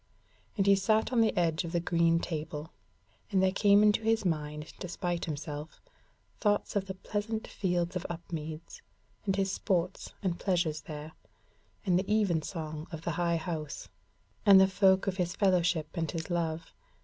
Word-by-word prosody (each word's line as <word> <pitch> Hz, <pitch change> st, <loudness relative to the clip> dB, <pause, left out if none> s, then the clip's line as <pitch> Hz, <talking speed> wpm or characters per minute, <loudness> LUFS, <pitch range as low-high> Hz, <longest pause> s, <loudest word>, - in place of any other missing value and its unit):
And 195 Hz, -, +2 dB
he 200 Hz, 0 st, +6 dB
sat 215 Hz, +5 st, +1 dB
on 235 Hz, -, +4 dB
the 225 Hz, -, +2 dB
edge 165 Hz, -1 st, +2 dB
of 170 Hz, 0 st, -6 dB
the 170 Hz, -, +2 dB
green 165 Hz, -1 st, +2 dB
table, 155 Hz, -1 st, -5 dB, 0.6 s
and 195 Hz, -2 st, +2 dB
there 190 Hz, -, +4 dB
came 205 Hz, +1 st, +5 dB
into 210 Hz, +1 st, +4 dB
his 225 Hz, -1 st, +1 dB
mind 150 Hz, -2 st, -2 dB
despite 175 Hz, -1 st, -3 dB
himself 150 Hz, 0 st, -6 dB, 0.6 s
thoughts 205 Hz, -1 st, +1 dB
of 195 Hz, -1 st, 0 dB
the 190 Hz, -, -5 dB
pleasant 215 Hz, +3 st, -3 dB
fields 180 Hz, -2 st, -1 dB
of 180 Hz, -, -3 dB
Upmeads, 160 Hz, -2 st, -6 dB, 0.5 s
and 195 Hz, -, +2 dB
his 195 Hz, -1 st, 0 dB
sports 185 Hz, -1 st, -1 dB
and 175 Hz, -3 st, -1 dB
pleasures 175 Hz, -5 st, 0 dB
there, 150 Hz, 0 st, -8 dB, 0.7 s
and 180 Hz, -2 st, +3 dB
the 195 Hz, +2 st, -3 dB
even 200 Hz, -7 st, +2 dB
song 155 Hz, -2 st, -5 dB
of 160 Hz, -1 st, -7 dB
the 170 Hz, -, -1 dB
High 170 Hz, +1 st, +1 dB
House, 160 Hz, -3 st, -5 dB, 0.5 s
and 200 Hz, -2 st, +8 dB
the 190 Hz, -, +7 dB
folk 190 Hz, 0 st, +4 dB
of 195 Hz, -1 st, -1 dB
his 180 Hz, 0 st, -1 dB
fellowship 175 Hz, -5 st, +2 dB
and 165 Hz, -2 st, -1 dB
his 165 Hz, 0 st, -4 dB
love. 165 Hz, -1 st, -2 dB
175 Hz, 170 wpm, -30 LUFS, 160-195 Hz, 0.7 s, and